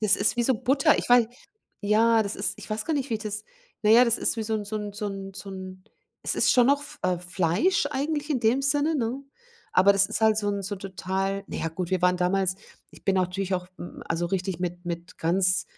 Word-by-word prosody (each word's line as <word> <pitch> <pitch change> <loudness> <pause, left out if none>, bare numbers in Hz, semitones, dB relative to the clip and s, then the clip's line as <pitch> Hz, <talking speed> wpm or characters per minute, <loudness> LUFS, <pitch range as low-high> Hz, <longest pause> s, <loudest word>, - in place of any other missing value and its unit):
Das 210 -2 +4
ist 205 +4 +1
wie 240 - +2
so 260 +2 +2
Butter. 270 +5 +3
Ich - - -3
wei 240 -2 +5 0.5
ja, 225 +2 +4
das 200 0 -4
ist - - +1
ich - - -10
weiß 215 0 -3
gar 320 - -1
nicht, 275 -3 -2
wie - - +1
ich 215 - -4
das 210 -1 -4 0.4
na 210 - +3
ja, 235 +3 +8
das 235 -1 +2
ist - - +1
wie 225 - -2
so 220 +1 -2
'n 210 -1 -2
so 215 +2 -4
'n 205 -1 -5
so 205 +1 -4
'n 195 0 -7
so 195 +1 -8
'n 185 -1 -9 0.4
es - - -1
ist - - +3
schon 245 -1 +5
noch 285 +1 +3
F 290 - -11
äh, 180 -1 +1
Fleisch 180 - +1
eigentlich 295 +2 -2
in 260 - +1
dem 230 +4 +2
Sinne, 290 +3 +2
ne, 255 +1 -2 0.5
aber 195 +2 +6
das 195 0 +4
ist - - -3
halt 220 -1 +4
so 205 -1 0
'n 200 -1 -3
so 200 +1 -4
total 195 +1 -3
na, - - -6
ja 165 - -2
gut, 170 +2 -5
wir 185 -1 0
waren 180 0 +4
damals 185 +1 +1 0.3
ich - - -18
bin 195 - +3
natürlich 185 +1 -1
auch, 180 -1 -3
hm, 175 - -9
also 165 +1 -1
richtig 185 -1 -3
mit 175 0 -4
mit 170 +1 -6
ganz, 185 +2 +2
200 Hz, 250 wpm, -26 LUFS, 185-230 Hz, 0.5 s, ja